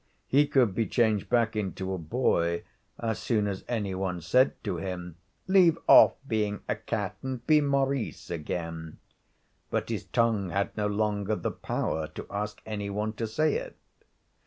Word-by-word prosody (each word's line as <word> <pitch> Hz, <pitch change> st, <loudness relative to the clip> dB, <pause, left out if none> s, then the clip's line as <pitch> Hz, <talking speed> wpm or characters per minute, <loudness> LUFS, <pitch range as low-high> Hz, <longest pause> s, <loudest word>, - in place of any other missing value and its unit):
He 145 Hz, +2 st, +4 dB
could 125 Hz, -9 st, +3 dB
be 115 Hz, +2 st, 0 dB
changed 110 Hz, -5 st, +1 dB
back 115 Hz, -3 st, +2 dB
into 95 Hz, -2 st, -2 dB
a 95 Hz, -, -3 dB
boy 85 Hz, -2 st, 0 dB, 0.3 s
as 110 Hz, -2 st, -2 dB
soon 110 Hz, -4 st, +1 dB
as 100 Hz, -2 st, -3 dB
any 105 Hz, -5 st, -2 dB
one 95 Hz, -1 st, -2 dB
said 125 Hz, -, +3 dB
to 100 Hz, -5 st, -2 dB
him, 90 Hz, -1 st, -5 dB, 0.3 s
'Leave 180 Hz, -4 st, +5 dB
off -, -, +8 dB
being 105 Hz, -3 st, -1 dB
a -, -, 0 dB
cat 110 Hz, -2 st, -3 dB
and 130 Hz, -2 st, -5 dB
be 155 Hz, -1 st, +5 dB
Maurice 140 Hz, -6 st, -1 dB
again,' 80 Hz, 0 st, -4 dB, 0.7 s
but -, -, -1 dB
his -, -, -3 dB
tongue 110 Hz, -5 st, +1 dB
had 100 Hz, +3 st, -1 dB
no 105 Hz, -1 st, 0 dB
longer 105 Hz, 0 st, 0 dB
the 90 Hz, -, -2 dB
power 80 Hz, 0 st, -2 dB
to -, -, -6 dB
ask 105 Hz, +1 st, -4 dB
any 105 Hz, -2 st, -4 dB
one 105 Hz, +2 st, -2 dB
to 115 Hz, +1 st, -3 dB
say 155 Hz, +7 st, +1 dB
it. -, -, -4 dB
105 Hz, 165 wpm, -28 LUFS, 95-120 Hz, 0.7 s, off